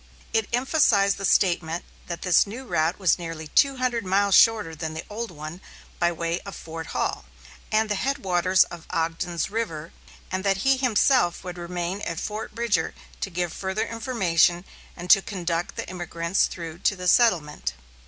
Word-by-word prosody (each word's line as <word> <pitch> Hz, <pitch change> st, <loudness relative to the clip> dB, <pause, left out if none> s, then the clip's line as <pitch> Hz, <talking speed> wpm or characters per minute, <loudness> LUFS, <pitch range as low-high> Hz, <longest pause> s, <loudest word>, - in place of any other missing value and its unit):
It 225 Hz, -2 st, +1 dB
emphasized 235 Hz, -6 st, +3 dB
the 195 Hz, -, -3 dB
statement 175 Hz, -3 st, +2 dB, 0.2 s
that 170 Hz, -1 st, -5 dB
this 180 Hz, +2 st, +4 dB
new 240 Hz, +6 st, -7 dB
route 160 Hz, -5 st, 0 dB
was 185 Hz, -4 st, +2 dB
nearly 165 Hz, -2 st, -6 dB
two 275 Hz, -, +3 dB
hundred 250 Hz, -2 st, 0 dB
miles 200 Hz, +1 st, +2 dB
shorter 215 Hz, -8 st, +5 dB
than 160 Hz, 0 st, -5 dB
the 160 Hz, -, -6 dB
old 230 Hz, +2 st, -4 dB
one 155 Hz, +2 st, -8 dB, 0.4 s
by 170 Hz, 0 st, +3 dB
way 170 Hz, +1 st, -2 dB
of 200 Hz, -, -9 dB
Fort 165 Hz, -1 st, -7 dB
Hall -, -, -2 dB, 0.5 s
and 220 Hz, 0 st, +2 dB
the 210 Hz, -, 0 dB
headwaters 190 Hz, -7 st, +2 dB
of 170 Hz, -2 st, -11 dB
Ogden's 165 Hz, +2 st, -2 dB
River, 170 Hz, -8 st, -4 dB, 0.4 s
and 185 Hz, +1 st, -2 dB
that 195 Hz, -1 st, +2 dB
he 270 Hz, 0 st, +4 dB
himself 250 Hz, -6 st, +2 dB
would 180 Hz, -1 st, -7 dB
remain 175 Hz, +2 st, -4 dB
at 165 Hz, -4 st, -3 dB
Fort 215 Hz, 0 st, -5 dB
Bridger 220 Hz, -9 st, 0 dB, 0.2 s
to -, -, -3 dB
give 175 Hz, -2 st, -2 dB
further 195 Hz, +3 st, -2 dB
information, 190 Hz, -8 st, +1 dB, 0.3 s
and 175 Hz, 0 st, -7 dB
to 195 Hz, -, +8 dB
conduct 175 Hz, -3 st, -3 dB
the -, -, -5 dB
emigrants 175 Hz, 0 st, -1 dB
through 165 Hz, -1 st, -7 dB
to 195 Hz, -, +1 dB
the 180 Hz, -1 st, -5 dB
settlement. 170 Hz, -, +3 dB
185 Hz, 170 wpm, -25 LUFS, 170-215 Hz, 0.5 s, to